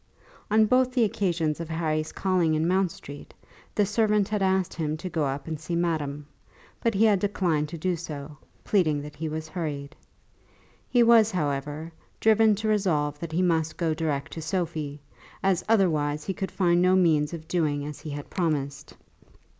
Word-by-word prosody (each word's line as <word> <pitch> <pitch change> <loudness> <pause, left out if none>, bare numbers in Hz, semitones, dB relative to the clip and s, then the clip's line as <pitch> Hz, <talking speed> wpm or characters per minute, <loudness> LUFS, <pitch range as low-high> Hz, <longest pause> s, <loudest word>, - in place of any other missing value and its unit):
On 215 +1 +5
both 255 +3 +3
the 250 -2 +3
occasions 170 -7 0
of 165 -1 -5
Harry's 155 -1 -1
calling 180 -5 +1
in 155 +2 +1
Mount 185 +1 +2
Street, 145 -2 -11 0.4
the 205 - +3
servant 210 -1 +2
had 210 -1 -1
asked 190 -1 +1
him 155 -2 -2
to 185 +3 -6
go 160 -3 0
up 140 +3 -3
and 160 -2 -4
see 170 +2 -4
madame; 150 -4 -1 0.6
but 230 -3 +1
he 215 +3 +4
had 205 -3 +4
declined 175 -7 0
to 170 - -6
do 180 +3 0
so, 150 -3 -7 0.3
pleading 155 -8 +1
that 150 0 -9
he 160 0 -4
was 155 +1 -4
hurried. 155 -3 -5 0.9
He 245 -1 +4
was, 230 -2 +6
however, 150 -2 -3 0.3
driven 220 -1 +5
to 215 +2 -3
resolve 155 -9 +1
that 165 0 -6
he 175 +3 +1
must 165 -3 +1
go 165 -2 0
direct 155 -3 -2
to 165 - -6
Sophie, 155 -3 -3 0.4
as 190 -2 +2
otherwise 155 -8 +2
he 190 - -3
could 190 0 -4
find 175 -2 +2
no 185 +1 +4
means 155 -5 +3
of 160 -2 -8
doing 150 -5 0
as 150 -1 -7
he 155 - -7
had 145 0 -6
promised. 145 -6 -2
165 Hz, 180 wpm, -26 LUFS, 150-190 Hz, 0.9 s, was